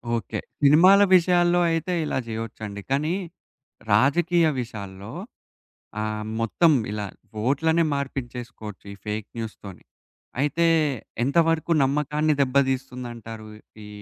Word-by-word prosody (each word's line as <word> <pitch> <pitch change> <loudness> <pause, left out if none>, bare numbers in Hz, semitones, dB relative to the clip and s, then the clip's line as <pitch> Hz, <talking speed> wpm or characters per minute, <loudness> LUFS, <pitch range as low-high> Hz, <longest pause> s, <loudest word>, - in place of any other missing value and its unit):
Okay. 115 -5 -4 0.2
సినిమాల 175 +8 +7
విషయాల్లో 175 0 +4
అయితే 165 +2 -1
ఇలా - - -2
జేయొచ్చండి. 110 -2 -6
కానీ 150 +5 +1 0.8
రాజకీయ 165 +9 +3 0.2
విషయాల్లో, 100 -4 -8 0.9
ఆహ్, 110 0 -3 0.2
మొత్తం 155 +9 +3 0.2
ఇలా 105 -1 -3 0.4
ఓట్లనే 160 +5 +2
మార్పిచ్చేసుకోవచ్చు 120 -6 -6
ఈ - - -14
ఫేక్ 105 0 -3
న్యూస్‌తోనీ. 105 -4 -8 0.6
అయితే, 155 +4 +2 0.6
ఎంతవరకు 165 +4 +2
నమ్మకాన్ని 150 +2 +1
దెబ్బ 130 -1 -1 0.2
తీస్తుందంటారు 120 -4 -6 0.4
ఈ - - -11
135 Hz, 100 wpm, -24 LUFS, 110-160 Hz, 0.9 s, సినిమాల